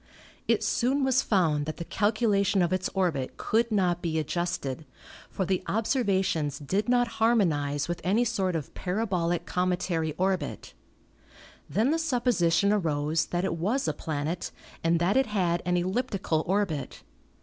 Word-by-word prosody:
It - - +2
soon 265 +3 +1
was 265 0 +3
found 155 -8 +1
that 155 - -4
the 170 - -5
calculation 205 -3 +2
of 175 +1 0
its 185 0 -1
orbit 165 -9 -1
could 230 +1 +1
not 180 -4 +1
be 165 -2 -1
adjusted, 160 -3 -2 0.5
for 190 - -2
the 185 0 0
observations 195 - 0
did 190 - -2
not 245 -1 +3
harmonize 155 -11 +2
with 175 0 -3
any 210 +7 +2
sort 195 -6 0
of 155 -4 -4
para 195 +5 -2
bolic 175 -4 -1
cometary 180 -3 -1
orbit. 185 0 -2 1.0
Then 230 +7 +2
the 325 - +1
supposition 235 - +2
arose 155 -4 0
that 175 +1 -1
it 170 -3 -2
was 210 +10 0
a 155 - +1
planet 155 +3 -3 0.3
and 165 +1 +3
that 180 +7 +2
it 265 -2 +3
had 180 -5 0
an 180 0 +2
elliptical 185 -4 -1
orbit. 180 -8 -1
185 Hz, 150 wpm, -27 LUFS, 165-210 Hz, 1.0 s, was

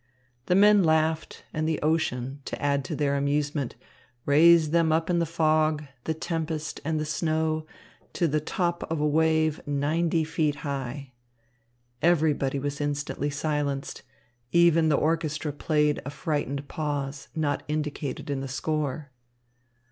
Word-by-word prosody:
The 180 - +3
men 205 0 +6
laughed, 160 0 +1
and 155 +1 -1
the 160 - 0
ocean, 145 -4 -1
to - - -5
add 140 -1 +1
to - - -3
their 140 -1 +1
amusement, 140 -1 -1 0.5
raised 160 +2 +6
them 165 -1 +3
up 165 +2 +1
in 170 - +2
the 170 - 0
fog, 155 -1 +2 0.2
the 160 - -1
tempest, 160 -2 -3
and 155 +1 -1
the 155 - -2
snow 155 0 -1 0.5
to 170 - +1
the 155 0 +1
top 170 +3 -1
of 165 - 0
a 150 - +1
wave 160 0 +2
ninety 160 +3 +1
feet 155 -2 0
high. 135 -1 -4 0.9
Everybody 155 -5 +2
was 145 +1 -3
instantly 145 0 -2
silenced. 145 -1 -2 0.5
Even 170 -2 +5
the 150 - +3
orchestra 155 -1 -1
played 150 0 +1
a 140 - -5
frightened 140 -1 -3
pause 145 -2 -3
not 150 -3 0
indicated 150 -2 -3
in 140 - -1
the 135 - -4
score. 145 0 -3
155 Hz, 140 wpm, -26 LUFS, 145-160 Hz, 0.9 s, men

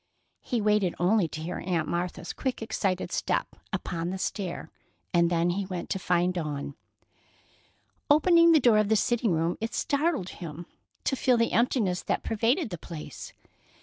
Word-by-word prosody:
He 240 -3 -1
waited 210 -4 +2
only 185 +1 +3
to 155 0 -7
hear 175 +3 -4
Aunt 170 -4 -1
Martha's 175 +1 -3
quick, 260 -4 -3
excited 195 -4 -1
step - - 0 0.2
upon 170 0 -3
the 190 - -3
stair, 190 -1 -4 0.4
and 170 -1 +4
then 170 0 +2
he 190 +2 -2
went 180 -2 -5
to 195 - 0
find 180 0 +1
Dawn. 150 -5 -4 1.4
Opening 335 +3 +6
the 320 - +6
door 235 -5 +5
of 210 -1 +1
the 220 - +4
sitting 230 0 +1
room, 165 +1 0
it 225 +1 -3
startled 285 - 0
him 170 0 -8 0.4
to - - +1
feel 250 -1 +3
the 230 0 +2
emptiness 220 -6 +1
that - - -2
pervaded 230 - +1
the 175 - -5
place. 160 -2 -8
190 Hz, 165 wpm, -28 LUFS, 175-230 Hz, 1.4 s, Opening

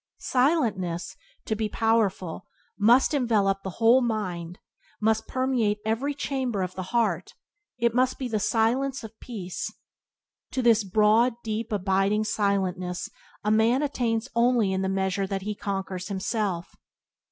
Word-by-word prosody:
Silentness, 215 - 0 0.3
to 220 - -1
be 215 0 -2
powerful, 205 -6 0 0.3
must 240 +8 +5
envelop 210 -8 +2
the 190 - -5
whole 235 +3 +5
mind, 185 -7 -3 0.4
must 220 +1 +1
permeate 255 -5 +1
every 255 +7 -1
chamber 260 -8 -2
of 185 0 -4
the 185 - -5
heart; 235 -1 0 0.4
it 235 -1 +1
must 255 +1 +2
be 260 - -3
the 220 -3 -1
silence 245 +6 +1
of 220 0 -11
peace. 190 -7 -5 0.8
To 260 - 0
this 225 -2 +5
broad, 215 +5 +3
deep, 225 +1 -3
abiding 195 +1 +1
silentness 190 -4 -1 0.3
a 210 - +1
man 230 +6 +3
attains 240 -5 -1
only 235 -4 +3
in 190 - 0
the 190 - 0
measure 190 0 0
that 195 0 -3
he 210 +1 -2
conquers 195 -2 -4
himself. 195 -2 -2
215 Hz, 140 wpm, -26 LUFS, 195-240 Hz, 0.8 s, must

